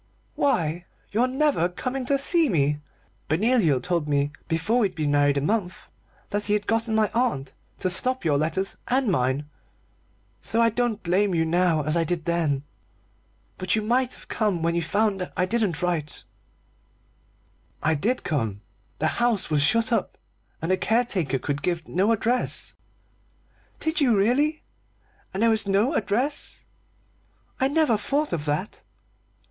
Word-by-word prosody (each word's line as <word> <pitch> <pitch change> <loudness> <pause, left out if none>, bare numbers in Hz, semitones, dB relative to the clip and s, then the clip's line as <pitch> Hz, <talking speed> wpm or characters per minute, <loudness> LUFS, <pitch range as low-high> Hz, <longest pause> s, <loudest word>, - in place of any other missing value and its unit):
"Why 175 - 0 0.3
your 235 +5 +2
never 265 - +1
coming 255 +8 -4
to 275 +2 +2
see 320 +2 +2
me. 150 -5 +1 0.5
Benoliel 175 - +3
told 170 -4 -1
me 145 0 +1 0.2
before 180 +9 +1
we'd 195 -6 0
been 150 -3 0
married 145 -1 +3
a - - +1
month 180 +2 -2 0.4
that 205 0 -1
he 205 - +1
had 210 0 0
got 225 +1 0
my 220 -1 +1
aunt 230 - 0 0.3
to 185 - +1
stop 250 +3 -2
your 145 -3 +2
letters 165 +6 -1
and 255 -3 +2
mine, 130 -1 0 0.9
so 230 - -2
I 230 0 +4
don't 230 -2 -1
blame 185 +2 +2
you 165 -1 +2
now 165 -2 +2
as 155 +2 0
I 170 - +3
did 165 -1 -2
then. 160 -5 0 1.0
But 185 +2 +1
you 215 - -1
might 250 +3 +1
have - - -14
come 200 -7 0
when 170 0 +1
you 170 - 0
found 195 +1 0
I 180 - +2
didn't 195 -6 -1
write." 165 -4 -2 1.6
"I 160 - +3
did 225 - -1
come. 110 - -2 0.4
The 155 - +1
house 230 -8 +1
was 150 -2 +3
shut 230 +11 +3
up, - - -1 0.5
and 165 - 0
the 185 - +3
caretaker 195 - 0
could 145 +2 -3
give 170 0 -2
no 195 +6 +1
address." 230 +3 0 1.1
"Did 315 +1 0
you 240 -6 +4
really? 285 +10 +2 0.7
And 195 +4 -1
there 230 - +5
was 220 -2 0
no 205 +9 +2
address? 245 +6 -1 0.9
I 265 - +3
never 290 -6 +2
thought 290 +6 -1
of 155 -3 -2
that." 150 +7 -2
195 Hz, 155 wpm, -25 LUFS, 160-235 Hz, 1.6 s, there